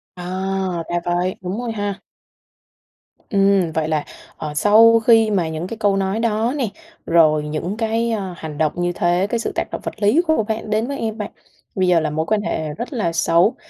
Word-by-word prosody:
À! 185 -1 -3
Ra 175 - 0
vậy, 175 +1 0
đúng 185 +2 -4
rồi 240 -2 -3
ha. 205 -2 -3 1.3
Ừm, 195 -4 +3
vậy 155 -1 -1
là, 155 -2 0 0.3
ờ, 150 -1 -5
sau 225 +7 +6
khi 225 -1 +4
mà 180 -5 +1
những 160 +2 -4
cái 230 - -6
câu 205 -2 +2
nói 195 +2 -1
đó 230 +2 0
nè, 260 -5 0 0.4
rồi 155 -3 +4
những 155 +7 -4
cái 230 +1 0
à 195 -5 -3
hành 155 -3 -7
động 155 -1 +2
như 175 0 0
thế, 175 +3 +1
cái 235 - -1
sự - - -2
tác - - +1
động - - -5
vật 215 - -6
lý 215 +12 +4
của 315 -8 +2
bạn 220 0 -4
đến 215 +2 0
với 280 0 -4
em 220 -1 -3
bạn 210 -2 -5 0.4
bây 185 -1 +1
giờ 175 -2 +4
là 155 -1 -1
mối 155 +2 -2
quan 215 +3 +1
hệ 160 -6 -2
rất 235 - -6
là 205 -9 -1
xấu. 170 +5 +3
195 Hz, 210 wpm, -20 LUFS, 170-220 Hz, 1.3 s, sau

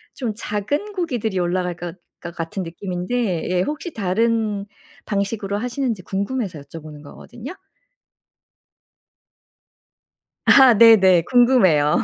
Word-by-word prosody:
좀 240 -5 -3
작은 235 - -3
고기들이 245 - -2
올라갈 180 0 -1
것 175 0 -7 0.3
것 170 0 -8
같은 165 +3 -5
느낌인데 180 +2 -3
예 180 0 +1
혹시 300 - -4
다른 215 +1 -1 0.4
방식으로 200 0 -2
하시는지 245 -2 -3
궁금해서 195 - -4
여쭤보는 150 +1 -11
거거든요. 240 - -11 2.9
아. 265 -3 +7
네네. 190 -7 +6
궁금해요. 215 - +4
200 Hz, 250 characters per minute, -20 LUFS, 180-240 Hz, 2.9 s, 아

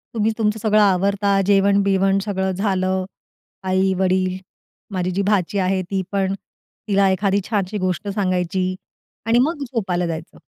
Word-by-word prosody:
तुम्ही 220 0 +2
तुमचं 215 0 0
सगळं 215 0 +3
आवरता, 200 +1 +2
जेवण-बिवण 195 0 +3
सगळं 190 -2 -1
झालं, 190 -1 0 0.6
आई, 190 0 +1
वडील, 185 0 +1 0.6
माझी 185 0 -1
जी 195 +2 -1
भाची 195 0 +1
आहे 190 0 +1
ती 190 -1 0
पण, 195 -1 0 0.5
तिला 195 -1 +3
एखादी 195 +1 +1
छानशी 205 -1 -1
गोष्ट 185 +2 -2
सांगायची 185 -2 -1 0.5
आणि 230 +2 +3
मग 310 -3 -3
झोपायला 180 -6 -1
जायचं. 160 0 -6
195 Hz, 135 wpm, -21 LUFS, 185-200 Hz, 0.6 s, सगळं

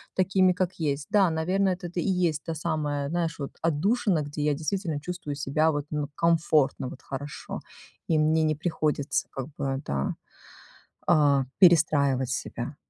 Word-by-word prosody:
такими, 185 0 +3
как 180 0 -1
есть. 145 -3 -2
Да, 200 -4 +5
наверно, 180 +5 +1
это 180 -1 -3
и 195 - 0
есть 170 -5 +1
та 165 - -3
самая, 150 -3 -2
знаешь, 165 -1 -1
вот 140 - -4
отдушина, 175 +3 +1
где 145 +1 -5
я 150 0 +2
действительно 160 0 -2
чувствую 175 -4 -5
себя 155 +3 +1
вот, 145 -1 -2
ну, 150 -1 -2
комфортно, 160 -5 +2
вот 130 - -11
хорошо. 140 +1 -6 0.5
И 160 - +2
мне 160 +1 +3
не 155 0 +2
приходится, 150 -2 -1
как 135 0 -5
бы, 135 0 -2
да, 70 -1 -1 0.9
а, 145 -4 +4 0.2
перестраивать 145 -7 +4
себя. 125 +1 -4
155 Hz, 155 wpm, -27 LUFS, 145-175 Hz, 0.9 s, Да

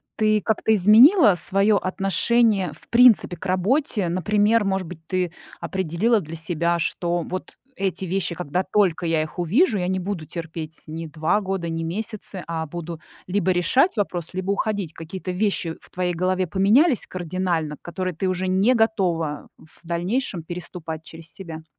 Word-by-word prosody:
ты 215 -1 +2
как-то 220 0 +2
изменила 220 - +7
свое 195 +4 +2
отношение 195 +1 +1
в - - -19
принципе 235 -6 +5
к 175 - -11
работе? 200 - +1
Например, 205 +5 +2
может 190 -3 -1
быть, 180 -1 -9
ты 180 -2 -1 0.3
определила 190 +5 0
для 160 -1 -8
себя, 170 +1 0
что 175 +1 -1
вот 185 +3 -6 0.2
эти 190 -1 -2
вещи, 185 -1 -2
когда 180 +2 -2
только 190 -4 +1
я 165 -1 +1
их 155 +3 -6
увижу, 215 - +3
я 180 - -1
не 185 0 0
буду 180 -3 -4
терпеть 160 -1 -7
ни 165 +1 -6
2 160 +6 0
года, 190 -3 -3
ни 165 0 -3
месяцы, 200 +1 -5
а 165 -1 -3
буду 170 0 -7 0.3
либо 185 0 +1
решать 205 - +2
вопрос, 175 -5 -2
либо 185 +1 -2
уходить. 200 -5 -2
Какие-то 180 +3 -6
вещи 180 -3 -1
в - - -19
твоей 180 -1 -2
голове 185 +2 0
поменялись 220 - +3
кардинально, 175 -3 -2
которые 185 +1 -4
ты 185 +4 -1
уже 185 0 -1
не 195 +7 +3
готова 180 -10 0
в 160 - -21
дальнейшем 175 +3 -2
переступать 170 -2 -7
через 165 -1 -13
себя? 160 -4 -9
185 Hz, 160 wpm, -23 LUFS, 165-205 Hz, 0.3 s, изменила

